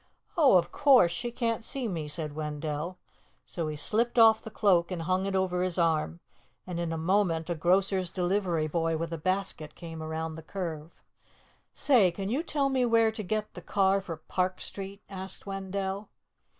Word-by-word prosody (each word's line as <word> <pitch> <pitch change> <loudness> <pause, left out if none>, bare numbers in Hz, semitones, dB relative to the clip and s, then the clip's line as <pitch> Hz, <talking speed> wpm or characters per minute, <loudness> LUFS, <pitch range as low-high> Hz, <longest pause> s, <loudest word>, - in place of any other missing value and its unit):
"Oh, 280 - +6
of 175 0 0
course. 265 -12 +5
She 240 +8 -4
can't 230 -2 -1
see 260 +1 -2
me," 165 -7 -3
said 150 0 -3
Wendell. 150 +3 -4 0.5
So 165 -3 -3
he 155 - -3
slipped 225 +11 0
off 225 -1 +7
the - - -8
cloak 190 -6 +3
and 175 -3 -4
hung 185 +3 0
it 195 - -2
over 185 -1 +1
his 185 -1 0
arm, 155 - +1 0.4
and 180 -2 -4
in 170 -1 -2
a 165 - -2
moment 170 -1 +1
a - - +2
grocer's 185 +2 +1
delivery 180 -3 0
boy 165 +1 0
with 165 +1 -4
a 165 - -4
basket 180 -4 -2
came 165 -2 -8
around 160 0 -3
the 160 - -8
curve. 165 -2 -6 0.8
"Say, 240 -10 +4
can 195 +3 -4
you 265 +7 0
tell 290 -4 0
me 260 -2 +1
where 230 -2 +4
to 220 - -5
get 215 +2 -2
the - - -8
car 195 -1 +2
for 170 -4 -6
Park 185 +3 -2
Street?" 195 0 -6
asked 190 -1 -8
Wendell. 195 0 -4
185 Hz, 185 wpm, -29 LUFS, 165-205 Hz, 0.8 s, off